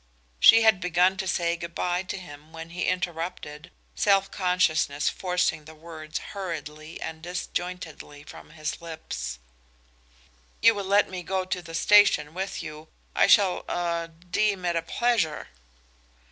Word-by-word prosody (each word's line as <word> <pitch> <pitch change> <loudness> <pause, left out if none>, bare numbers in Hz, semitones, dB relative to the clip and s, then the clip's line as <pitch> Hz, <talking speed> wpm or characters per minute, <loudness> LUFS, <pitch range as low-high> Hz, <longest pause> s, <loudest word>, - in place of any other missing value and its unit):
She 225 - +8
had 220 -4 +5
begun 180 +1 +3
to 190 -1 -3
say 170 -1 +1
good 170 0 -8
by 180 0 0
to 190 - -5
him 150 -3 -12
when 165 0 -9
he 180 +1 -2
interrupted, 170 -3 -3 0.2
self 195 -1 +2
consciousness 160 -6 +1
forcing 180 -4 -1
the 160 +1 -12
words 155 -1 -7 0.2
hurriedly 160 -5 -6
and 160 0 -6
disjointedly 175 -3 -5
from - - -12
his 155 +1 -5
lips: 65 - -6 1.2
"You 230 +1 +6
will 200 -2 -4
let 200 +2 +4
me 185 -1 -6
go 185 +1 -2
to 185 -1 -3
the 165 -1 -9
station 180 -5 +5
with 190 +2 -4
you. 155 0 -9 0.3
I - - +5
shall 195 -4 +4
er 170 -1 -1
deem 180 +4 -1
it 175 -1 0
a 165 - +1
pleasure." 215 -4 0
175 Hz, 145 wpm, -26 LUFS, 160-185 Hz, 1.2 s, She